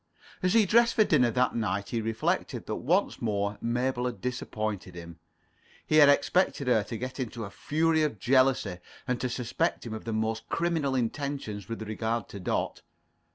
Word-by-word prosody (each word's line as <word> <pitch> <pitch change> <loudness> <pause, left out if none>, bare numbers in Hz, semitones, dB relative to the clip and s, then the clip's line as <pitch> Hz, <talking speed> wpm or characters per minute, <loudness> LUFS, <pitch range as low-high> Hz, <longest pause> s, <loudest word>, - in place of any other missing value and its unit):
As 180 0 +2
he 220 -2 +6
dressed 235 +4 +4
for 220 - +6
dinner 135 - +3
that 125 +2 +1
night, 100 -3 -1
he 115 - -1
reflected 110 0 -1
that - - -3
once - - +1
more 100 -2 -1
Mabel 125 +1 0
had 125 - -5
disappointed 110 -7 -4
him. 85 -1 -10 0.7
He 155 - +2
had 145 -2 +8
expected 145 -1 +2
her 120 -4 +4
to 115 - -5
get 130 +4 -6
into 120 -3 -4
a 100 - -9
fury 160 +6 +1
of 150 -7 0
jealousy, 125 -4 +2 0.3
and 125 -1 -1
to 125 - -1
suspect 120 0 -1
him 115 - -5
of 110 - -7
the 115 - -3
most 110 +1 -2
criminal 165 -5 0
intentions 120 -5 -3
with 115 -1 -4
regard 110 +1 -2
to 100 - -8
Dot. 90 - -2
120 Hz, 180 wpm, -28 LUFS, 110-140 Hz, 0.7 s, had